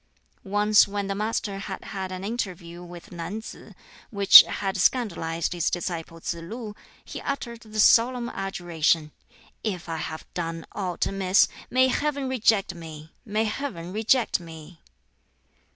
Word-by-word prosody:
Once 205 +2 +4
when 200 0 -3
the 195 - -2
Master 210 -1 -2
had 195 -1 -6
had 190 -2 -5
an 185 0 -6
interview 180 -6 -5
with 175 -1 -12
Nan 175 +4 -5
tsz, 220 - -11 0.3
which 200 -2 +10
had 195 -2 -3
scandalized 180 -6 0
his 175 -2 0
disciple 165 -2 -4
Tsz 165 - -3
lu, 215 +5 -7 0.3
he - - -7
uttered 240 -4 -4
the 215 -1 -7
solemn 240 +3 +5
adjuration, 170 -6 -1 0.5
"If 185 -6 -3
I 165 -1 -3
have 155 0 -6
done 165 -2 -4
aught 185 -3 -2
amiss, 195 0 +3 0.2
may 260 +1 +4
Heaven 285 0 -1
reject 225 -7 +2
me! 160 -2 -10
may 215 0 0
Heaven 210 -6 -4
reject 225 +2 +2
me!" 165 0 -12
195 Hz, 140 wpm, -25 LUFS, 170-220 Hz, 0.5 s, which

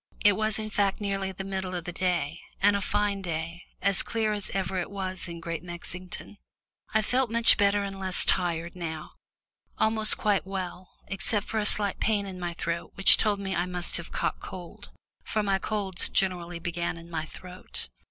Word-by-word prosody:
It 205 - +8
was 215 +1 +1
in 215 -1 -4
fact 200 -1 +1
nearly 195 -2 -1
the 190 +1 -6
middle 190 -1 -3
of 175 - -3
the 180 - -5
day, 175 -3 -1 0.2
and 205 +1 +5
a 200 - 0
fine 205 0 0
day 165 -1 -4 0.2
as 200 -2 +5
clear 220 -2 0
as 205 -2 -2
it - - -7
ever 185 -2 -1
was 185 -2 -4
in 170 -1 -7
Great 165 -1 -4
Mexington. 180 +3 -6 0.5
I 220 0 +3
felt 255 +2 +1
much 230 0 +7
better 205 0 +3
and 195 -1 -5
less 190 -1 +2
tired 170 -1 +1
now, 160 -3 -5 0.7
almost 220 0 +3
quite 205 -2 +2
well, 185 -1 -5 0.2
except 195 +2 +2
for 220 - -1
a 210 - +2
slight 205 -2 +2
pain 205 -2 +1
in 190 -2 -7
my 175 -1 -3
throat 170 0 -3
which 195 - +9
told 210 -2 +2
me 195 -1 -2
I 175 +1 0
must 180 -1 -1
have 170 - -7
caught - - -1
cold, 175 -2 -9 0.4
as 215 -2 +1
my 195 -1 +2
colds 195 -3 -2
generally 175 -2 0
began 170 0 -3
in 165 0 -11
my 160 -2 -3
throat. 180 +3 -7
190 Hz, 190 wpm, -28 LUFS, 175-205 Hz, 0.7 s, which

